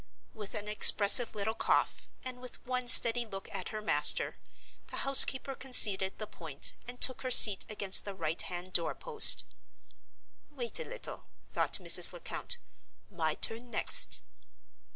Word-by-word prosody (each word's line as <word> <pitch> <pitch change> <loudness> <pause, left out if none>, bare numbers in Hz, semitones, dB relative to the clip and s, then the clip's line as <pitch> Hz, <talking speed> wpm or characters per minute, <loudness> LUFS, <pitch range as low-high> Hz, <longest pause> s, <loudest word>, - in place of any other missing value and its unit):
With 210 -2 -13
an 210 - -10
expressive 215 +2 +3
little 215 +1 -7
cough, - - -5 0.2
and 255 -1 -11
with 250 - -14
one 250 0 -8
steady 240 0 +5
look 195 -4 -13
at 190 -2 -9
her 215 0 -11
master, - - +1 0.5
the - - -13
housekeeper 275 0 +3
conceded 205 -8 +2
the 215 - -10
point, 160 -8 -5
and 245 0 -12
took 255 - +2
her 255 - -9
seat 210 -5 +7
against 200 -2 -1
the 200 -1 -12
right 160 -2 -7
hand 180 +1 -12
door 170 -2 -4
post. 460 -3 +4 1.1
"Wait 255 - -7
a 485 - -8
little," - - -12 0.3
thought - - -6
Mrs. - - +2
Lecount; 485 - -8 0.5
"my 160 -4 -6
turn 235 +2 -4
next!" - - -2
220 Hz, 150 wpm, -26 LUFS, 195-250 Hz, 1.1 s, seat